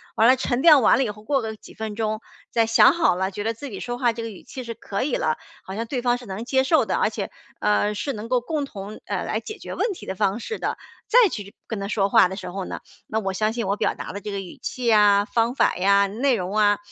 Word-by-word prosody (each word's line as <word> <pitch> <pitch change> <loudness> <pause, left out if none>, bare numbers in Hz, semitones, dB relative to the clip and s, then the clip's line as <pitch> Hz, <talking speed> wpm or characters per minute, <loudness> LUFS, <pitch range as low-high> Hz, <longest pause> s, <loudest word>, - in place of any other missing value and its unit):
完 225 - +5
了 255 - +7
沉 255 -1 -1
淀 300 -4 +8
完 - - +6
了 270 - +2
以 225 - -2
后， 210 +1 -9
过 275 +3 +1
个 220 -1 -4
几 210 - -15
分 220 -1 -5
钟， 215 0 -2 0.3
再 230 -1 +3
想 225 - +6
好 335 - +3
了， 190 +1 -1
觉 205 +2 -5
得 225 +1 0
自 280 +5 -7
己 195 - -6
说 245 0 -4
话 245 -2 +2
这 230 - -6
个 230 - -4
语 200 - -11
气 260 - -8
是 230 -1 -6
可 200 -2 -4
以 270 0 0
了， 155 0 0 0.3
好 190 - -8
像 230 +2 -3
对 255 -1 -2
方 245 0 +2
是 245 - -12
能 195 +4 -5
接 265 +1 +2
受 315 +4 +3
的， - - -1
而 - - +2
且， - - -5 0.3
呃， 210 0 +2
是 240 +8 -2
能 215 +1 -7
够 250 -1 +3
共 295 +4 -2
同， 210 -5 -8
呃， - - -2
来 - - -1
解 430 0 -8
决 - - -8
问 465 - 0
题 375 - -8
的 - - -3
方 195 +4 0
式 445 - -5
的。 - - -2 0.3
再 475 -3 +6
去 205 - -7
跟 220 - -4
他 195 - -3
说 200 -1 +1
话 225 -4 +6
的 190 - -6
时 - - -6
候 190 +1 -4
呢， - - -6 0.3
那 220 - -1
我 195 -3 -2
相 215 +3 0
信 230 -4 -2
我 200 - +1
表 - - 0
达 - - -7
的 200 - -6
这 210 - -5
个 200 - -3
语 185 -3 -9
气 245 -2 -1
啊、 205 -1 +5
方 230 +2 +1
法 - - +2
呀、 200 +2 +4
内 245 +6 +1
容 190 0 -3
啊， 205 -1 +4
220 Hz, 310 characters per minute, -23 LUFS, 200-245 Hz, 0.3 s, 淀